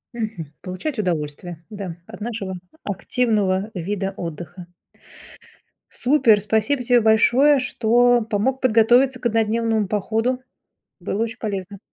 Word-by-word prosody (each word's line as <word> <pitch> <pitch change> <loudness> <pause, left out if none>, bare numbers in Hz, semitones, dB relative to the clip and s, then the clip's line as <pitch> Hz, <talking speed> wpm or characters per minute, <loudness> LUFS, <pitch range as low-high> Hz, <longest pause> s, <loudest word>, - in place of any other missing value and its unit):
Мгм. 215 -10 -5
Получать 215 +8 -5
удовольствие, 165 -1 -3
да, 195 -5 -6
от 215 -1 -12
нашего 210 -4 -4 0.3
активного 205 -1 0
вида 195 +2 -3
отдыха. 175 +2 -7 1.2
Супер, 250 -5 +3
спасибо 220 +6 0
тебе 245 0 +4
большое, 250 +6 +4
что 245 0 +3
помог 255 +6 0
подготовиться 250 +2 +4
к - - -15
однодневному 225 -1 +1
походу, 225 +5 -1 0.6
было 215 +3 -2
очень 230 +1 -5
полезно. 200 -2 -5
220 Hz, 110 wpm, -22 LUFS, 195-240 Hz, 1.2 s, тебе